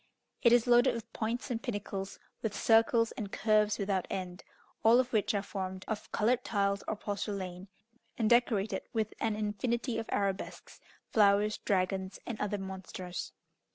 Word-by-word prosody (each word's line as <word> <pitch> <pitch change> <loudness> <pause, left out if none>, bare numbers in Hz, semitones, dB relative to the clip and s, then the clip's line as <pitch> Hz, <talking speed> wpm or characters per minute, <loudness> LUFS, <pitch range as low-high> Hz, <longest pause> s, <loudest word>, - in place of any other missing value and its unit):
It 235 - +6
is 240 -1 +5
loaded 245 +1 +5
with 230 0 -8
points 235 +4 -2
and 230 -1 -2
pinnacles, 200 -4 -4 0.2
with 220 -2 -2
circles 230 0 +4
and 205 -3 -6
curves 215 0 +2
without 195 -2 -1
end, 185 0 -5 0.4
all 230 +2 +7
of 255 -1 0
which 215 -1 +2
are 200 - 0
formed 190 -2 -5
of 215 -2 -4
coloured 245 +3 +2
tiles 200 -2 0
or - - -1
porcelain, 200 -3 -4 0.5
and 225 - +1
decorated 225 -3 +2
with 220 -2 -1
an 220 -2 0
infinity 225 +3 -1
of 225 - -6
arabesques, 195 -1 -3 0.3
flowers, 210 0 +4
dragons, 190 0 -1
and 230 -3 -5
other 210 0 -1
monsters. 185 -3 -6
210 Hz, 155 wpm, -31 LUFS, 195-230 Hz, 0.5 s, all